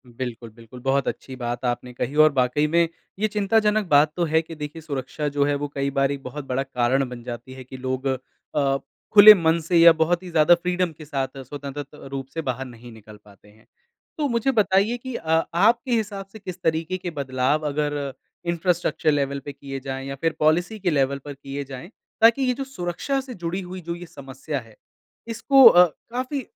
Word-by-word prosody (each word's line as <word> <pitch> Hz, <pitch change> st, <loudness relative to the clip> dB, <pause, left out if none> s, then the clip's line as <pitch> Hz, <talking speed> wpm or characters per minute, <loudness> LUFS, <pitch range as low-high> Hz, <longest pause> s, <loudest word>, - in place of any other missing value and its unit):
बिल्कुल, 120 Hz, -1 st, -6 dB
बिल्कुल। 115 Hz, +2 st, -14 dB
बहुत 135 Hz, +1 st, +1 dB
अच्छी 130 Hz, -, -5 dB
बात 120 Hz, 0 st, -4 dB
आपने 125 Hz, 0 st, -2 dB
कही 135 Hz, +3 st, -4 dB
और 155 Hz, -, +4 dB
वाक़ई 130 Hz, +3 st, +2 dB
में 170 Hz, +2 st, +3 dB, 0.3 s
ये 215 Hz, -, +2 dB
चिंताजनक 210 Hz, 0 st, +1 dB
बात 150 Hz, 0 st, +4 dB
तो 175 Hz, -, +1 dB
है 160 Hz, 0 st, +2 dB
कि 165 Hz, 0 st, -10 dB
देखिए 150 Hz, +1 st, -7 dB
सुरक्षा 145 Hz, -1 st, -4 dB
जो 145 Hz, 0 st, +1 dB
है 145 Hz, 0 st, +1 dB
वो 145 Hz, +1 st, -3 dB
कई 140 Hz, 0 st, 0 dB
बार 135 Hz, 0 st, +3 dB
एक 140 Hz, -1 st, -5 dB
बहुत 140 Hz, +3 st, -7 dB
बड़ा 130 Hz, +1 st, -1 dB
कारण 130 Hz, 0 st, 0 dB
बन 120 Hz, -1 st, -9 dB
जाती 125 Hz, +2 st, -7 dB
है 130 Hz, 0 st, -10 dB
कि 130 Hz, +1 st, -10 dB
लोग 130 Hz, +1 st, -3 dB
अ, 135 Hz, +1 st, -2 dB, 0.4 s
खुले 210 Hz, 0 st, +11 dB
मन 165 Hz, -3 st, +2 dB
से 170 Hz, +2 st, +1 dB
या 170 Hz, 0 st, +9 dB
बहुत 165 Hz, +3 st, 0 dB
ही 180 Hz, -, -8 dB
ज़्यादा 165 Hz, +1 st, +5 dB
फ्रीडम 180 Hz, 0 st, -1 dB
के 155 Hz, -, -10 dB
साथ 135 Hz, -2 st, -3 dB
स्वतंत्र 140 Hz, +2 st, -6 dB
त 145 Hz, +2 st, -17 dB
रूप 135 Hz, -1 st, -5 dB
से 165 Hz, -, -2 dB
बाहर 130 Hz, -2 st, -3 dB
नहीं 120 Hz, -1 st, -12 dB
निकल 110 Hz, -1 st, -14 dB
पाते 100 Hz, -1 st, -19 dB
हैं। 110 Hz, +1 st, -22 dB, 0.5 s
तो 300 Hz, -2 st, 0 dB
मुझे 235 Hz, +2 st, +1 dB
बताइए 210 Hz, 0 st, +2 dB
कि 255 Hz, 0 st, -7 dB
अ, 160 Hz, -3 st, +1 dB
आपके 230 Hz, +8 st, +3 dB
हिसाब 210 Hz, -4 st, -1 dB
से 220 Hz, -, -11 dB
किस 185 Hz, -2 st, -8 dB
तरीके 160 Hz, +3 st, 0 dB
के 180 Hz, -1 st, -5 dB
बदलाव 140 Hz, +1 st, -1 dB
अगर 145 Hz, -1 st, -2 dB, 0.3 s
इंफ्रास्ट्रक्चर 170 Hz, -2 st, 0 dB
लेवल 140 Hz, -1 st, -1 dB
पे 145 Hz, -, -6 dB
किए 135 Hz, -1 st, -7 dB
जाएँ 135 Hz, 0 st, -6 dB
या 135 Hz, -, -5 dB
फिर 165 Hz, -1 st, 0 dB
पॉलिसी 175 Hz, +7 st, +1 dB
के 185 Hz, -2 st, 0 dB
लेवल 140 Hz, -2 st, +1 dB
पर 145 Hz, -, -6 dB
किए 140 Hz, +1 st, -6 dB
जाएँ, 135 Hz, +5 st, -9 dB, 0.3 s
ताकि 230 Hz, +4 st, +6 dB
ये 250 Hz, -1 st, +2 dB
जो 275 Hz, -, -4 dB
सुरक्षा 265 Hz, +2 st, -3 dB
से 260 Hz, -1 st, -9 dB
जुड़ी 175 Hz, -1 st, -4 dB
हुई 185 Hz, 0 st, -8 dB
जो 170 Hz, 0 st, -5 dB
ये 175 Hz, +1 st, -9 dB
समस्या 140 Hz, -1 st, -6 dB
है 115 Hz, -3 st, -16 dB, 0.5 s
इसको 265 Hz, +4 st, +5 dB
अ, 180 Hz, -6 st, +9 dB, 0.3 s
काफ़ी 255 Hz, +3 st, -3 dB
150 Hz, 210 wpm, -23 LUFS, 135-180 Hz, 0.5 s, खुले